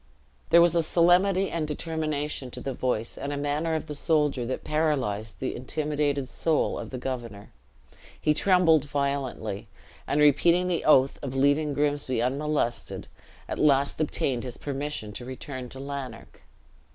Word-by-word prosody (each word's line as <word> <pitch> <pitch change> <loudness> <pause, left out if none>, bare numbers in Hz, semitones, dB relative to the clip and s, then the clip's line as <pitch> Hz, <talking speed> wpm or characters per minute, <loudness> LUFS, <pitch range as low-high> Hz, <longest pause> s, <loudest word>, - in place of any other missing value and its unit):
There 170 0 +7
was 175 - +4
a 170 - +3
solemnity 180 +4 +3
and 160 -2 -2
determination 150 -3 -3
in - - -7
the 135 - -3
voice 120 -3 -2
and 140 0 -3
manner 150 +3 -1
of 160 - -3
the 150 - -6
soldier 145 -4 +1
that 130 - -3
paralyzed 130 -10 -1
the 130 - -3
intimidated 145 +1 -1
soul 155 +5 0
of - - -6
the 130 - -5
governor; 120 -5 -6 0.7
he 150 - +2
trembled 165 -4 +4
violently, 140 -8 -2 0.4
and 145 - +1
repeating 170 +5 +4
the 175 -2 -1
oath 135 -3 +4
of 135 -2 -5
leaving 145 +2 +2
Grimsby 145 -3 0
unmolested, 135 0 -1 0.4
at - - -4
last 140 0 +3
obtained 135 -5 0
his 125 -2 -6
permission 140 -6 -4
to 120 - -7
return 130 0 -7
to 130 - -9
Lanark. 135 -4 -7
145 Hz, 150 wpm, -27 LUFS, 130-155 Hz, 0.7 s, There